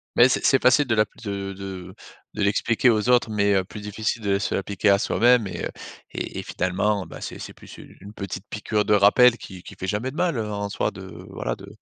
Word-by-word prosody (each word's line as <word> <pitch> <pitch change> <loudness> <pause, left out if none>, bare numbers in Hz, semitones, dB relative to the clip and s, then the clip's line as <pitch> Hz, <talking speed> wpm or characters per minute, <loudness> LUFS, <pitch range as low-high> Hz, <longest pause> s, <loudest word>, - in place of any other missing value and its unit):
Mais 120 +2 +7
c'est - - 0
c'est 135 - +4
facile 135 +3 +5
de 115 - +1
l'appli 105 -1 -1
de 100 -1 -4
de 95 -1 -8 0.4
de 105 - -4
l'expliquer 115 +4 +2
aux 110 +1 +1
autres, 125 -2 +4
mais 100 -1 +2
heu, 95 - +2
plus 105 +3 -10
difficile 110 +2 -3
de 100 -1 +1
se 100 - -2
l'appliquer 100 +1 0
à 100 0 +5
soi-même 120 -1 +3
et 95 - -6
heu, - - -3 0.4
et - - -5
et - - -5
finalement 95 +2 -1
bah, 80 - -11
c'est - - -7
c'est - - -8
plus - - -14
une - - -14
une 100 +2 -11
petite 100 -1 -6
piqûre 105 0 -1
de 105 - +2
rappel 115 +4 +6
qui 95 -2 -11
qui 100 - -11
fait 95 0 -6
jamais 110 +7 -2
de - - -13
mal, 175 -6 0
heu, 105 -1 -3
en 100 0 -3
soi 100 - -1
de 95 -1 -10 0.2
voilà, - - -4
de - - -13
105 Hz, 245 wpm, -24 LUFS, 100-115 Hz, 0.4 s, Mais